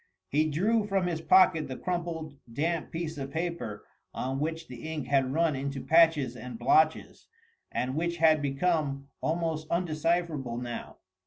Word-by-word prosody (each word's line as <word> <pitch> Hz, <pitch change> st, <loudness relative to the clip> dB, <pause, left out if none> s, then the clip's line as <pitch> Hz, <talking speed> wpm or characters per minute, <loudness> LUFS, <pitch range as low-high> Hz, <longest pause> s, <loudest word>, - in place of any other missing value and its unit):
He 155 Hz, +2 st, +2 dB
drew 210 Hz, +8 st, +1 dB
from 195 Hz, -2 st, +1 dB
his 170 Hz, -2 st, -2 dB
pocket 165 Hz, -4 st, +5 dB
the 130 Hz, -1 st, -6 dB
crumpled, 170 Hz, -4 st, -3 dB, 0.2 s
damp 160 Hz, +6 st, -1 dB
piece 165 Hz, -2 st, -4 dB
of 135 Hz, 0 st, -4 dB
paper 160 Hz, -9 st, -4 dB, 0.3 s
on 135 Hz, +1 st, -2 dB
which 160 Hz, +2 st, -3 dB
the 125 Hz, +6 st, -7 dB
ink 155 Hz, -4 st, -3 dB
had 135 Hz, -2 st, +2 dB
run 160 Hz, 0 st, +2 dB
into 140 Hz, +1 st, -3 dB
patches 160 Hz, -6 st, +4 dB
and 125 Hz, -1 st, -7 dB
blotches, 155 Hz, +7 st, +2 dB, 0.4 s
and 130 Hz, +1 st, -1 dB
which 170 Hz, +3 st, -1 dB
had 160 Hz, -2 st, +5 dB
become 140 Hz, -1 st, 0 dB
almost 160 Hz, -1 st, -1 dB
undecipherable 165 Hz, -6 st, 0 dB
now. 120 Hz, -1 st, -6 dB
155 Hz, 150 wpm, -29 LUFS, 135-170 Hz, 0.4 s, pocket